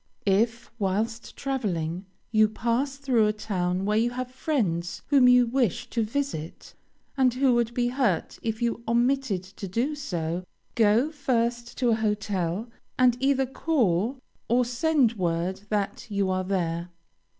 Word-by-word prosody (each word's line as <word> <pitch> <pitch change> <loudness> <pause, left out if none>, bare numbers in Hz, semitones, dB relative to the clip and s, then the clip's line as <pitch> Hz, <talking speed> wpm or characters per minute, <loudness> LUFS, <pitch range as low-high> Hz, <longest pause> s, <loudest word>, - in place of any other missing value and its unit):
If, 225 +4 +1
whilst 220 +4 -2
traveling, 185 - -2 0.2
you 215 -1 +4
pass 240 +5 -1
through 255 -6 +2
a 210 - +1
town 185 -3 -2
where 210 +1 +2
you 235 +2 +2
have 250 +1 -5
friends 195 - -1
whom 275 -3 +6
you 250 0 +6
wish 240 -1 0
to 235 - 0
visit, 220 - -4 0.4
and 255 -2 +3
who 260 -1 +3
would 235 -1 +1
be 245 -1 +1
hurt 245 -9 0
if 225 0 -2
you 235 0 -1
omitted 240 -4 +1
to 195 +1 -8
do 235 +11 -1
so, 175 - -3 0.3
go 230 +6 +3
first 240 -5 -1
to 250 -2 +2
a 225 - +4
hotel, 210 -2 -1 0.3
and 250 -2 +5
either 270 0 +2
call 250 - 0 0.3
or 245 +2 +3
send 255 0 +2
word 175 +1 -1
that 205 -2 -2
you 200 -2 0
are 185 0 -1
there. 170 -2 -1
230 Hz, 150 wpm, -26 LUFS, 195-255 Hz, 0.4 s, whom